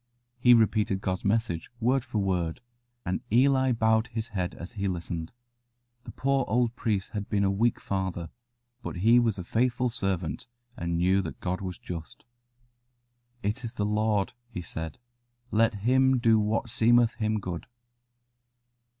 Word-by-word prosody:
He 125 0 +7
repeated 110 -3 +2
God's 95 -1 -2
message 100 -5 0
word 125 +2 +2
for 120 -3 -5
word, 90 -5 0 0.5
and 90 - -1
Eli 130 +2 +4
bowed 110 -1 +2
his 115 -1 -4
head 90 -5 -3
as 85 - -8
he 100 -4 -2
listened. 85 -2 -4 0.7
The - - -7
poor 135 0 +1
old 120 0 +1
priest 105 -6 -1
had 105 -2 -4
been 100 -1 +1
a 95 - +3
weak 115 +4 +1
father, 95 -3 -3 0.5
but - - -5
he 120 +2 +7
was 115 -4 +1
a 90 - -4
faithful 125 +5 +1
servant, 95 -7 -2 0.3
and 85 -4 -2
knew 95 +3 +3
that 85 - -7
God 90 +1 -2
was 90 -2 -5
just. 85 +3 -8 1.2
"It 105 +6 -1
is 115 - -5
the 105 - 0
Lord," 105 0 +1 0.2
he 90 -7 -6
said: 80 -1 -6 0.5
"let 115 0 +3
Him 130 +5 +3
do 115 -2 +4
what 110 +3 -1
seemeth 120 0 +4
Him 110 0 +1
good." 90 -4 -5
105 Hz, 155 wpm, -28 LUFS, 95-120 Hz, 1.2 s, He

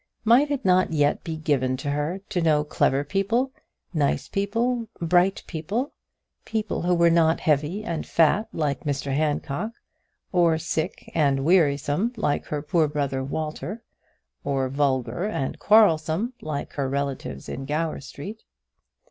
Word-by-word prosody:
Might 250 +6 +5
it 285 -2 -2
not 185 -1 +4
yet 145 -2 +1
be 160 -1 -4
given 135 -5 0
to 140 +2 -3
her 150 +6 -2
to 185 -4 0
know 155 -2 +3
clever 140 -2 +1
people, 200 - 0 0.4
nice 145 -4 0
people, 230 +4 -1
bright 175 +3 +2
people, 195 - -3 0.5
people 220 -2 -2
who 180 +1 +2
were 170 0 +4
not 165 -1 +3
heavy 155 +7 +1
and 170 -5 -3
fat 170 +7 +3
like 145 -4 -2
Mr 140 -2 -2
Handcock, 150 +7 -1 0.6
or 170 -3 +3
sick 160 0 -3
and 140 -3 +2
wearisome 155 - +2
like 145 -9 0
her 150 -1 -3
poor 160 0 +2
brother 140 -3 -2
Walter, 155 - -4 0.6
or 135 -2 0
vulgar 140 +4 0
and 135 -11 -3
quarrelsome 200 +1 +4
like 150 -2 -4
her 140 -2 -1
relatives 135 - -3
in 135 - -5
Gower 155 +3 -1
Street? 200 +11 -8
160 Hz, 140 wpm, -25 LUFS, 145-195 Hz, 0.6 s, Might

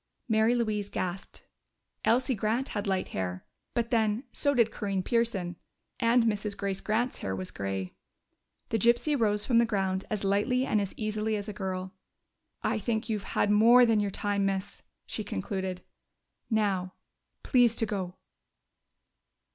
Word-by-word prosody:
Mary 220 +1 +3
Louise 215 -4 -1
gasped. 185 0 -5 0.6
Elsie 255 +3 +3
Grant 225 +5 -1
had 205 -1 -3
light 190 -1 0
hair 90 -1 -4 0.3
but, 235 -1 0
then, 220 0 +2
so 285 0 +2
did 230 -3 +4
Corinne 195 -3 -2
Pearson.... 200 -8 0 0.4
And 235 +1 +4
Mrs. 210 -2 -1
Grace 195 -1 -2
Grant's 235 +4 0
hair 95 -1 -3
was 95 -1 -4
gray. 95 -1 -4 0.8
The 225 - 0
gypsy 240 +7 +3
rose 210 -4 +1
from 235 -3 +4
the 235 - +5
ground 190 -3 -1
as 210 -2 -2
lightly 210 +7 +2
and 215 - +1
as 200 - -4
easily 215 0 -1
as 205 0 -4
a 210 - -4
girl. 190 -1 -4 0.7
"I - - +1
think 220 +1 -2
you've 210 -3 -3
had 205 - +3
more 235 +4 +7
than 225 -2 +3
your 205 -1 0
time, 200 +1 -1
miss," 195 0 -2 0.2
she 215 - -4
concluded. 190 - -4 0.7
"Now, 200 -5 0 0.5
please 245 -3 +4
to 225 - +2
go!" 190 -4 -4
210 Hz, 155 wpm, -29 LUFS, 190-230 Hz, 0.8 s, more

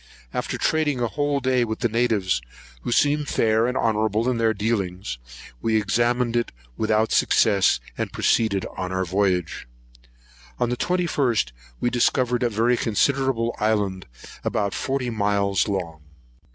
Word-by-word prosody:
After - - -2
trading 150 -4 +1
a 120 - +1
whole 145 +2 -1
day 130 -1 +2
with 110 -2 -4
the 120 - +3
natives, 110 - +1 0.4
who - - -4
seemed 145 +3 +2
fair 110 -1 +2
and 125 +1 -1
honourable 110 0 +1
in 125 -2 0
their 115 -1 +3
dealings, 95 - -2 0.4
we 110 -1 +1
examined 120 +3 +1
it 120 0 0 0.2
without 110 0 +1
success, 100 - +3 0.2
and - - -2
proceeded 100 -4 +1
on 95 0 -4
our 95 0 -1
voyage. 90 -4 -1 0.9
On 120 - 0
the 125 - -1
21st 145 - 0 0.3
we 120 - 0
discovered 125 0 +1
a 120 - +2
very 115 +3 +2
considerable 120 +1 +1
island, 105 -4 0 0.2
of - - -13
about 100 -1 0
forty 130 -2 -2
miles 100 -3 +1
long. 85 -6 -3
115 Hz, 145 wpm, -23 LUFS, 100-125 Hz, 0.9 s, the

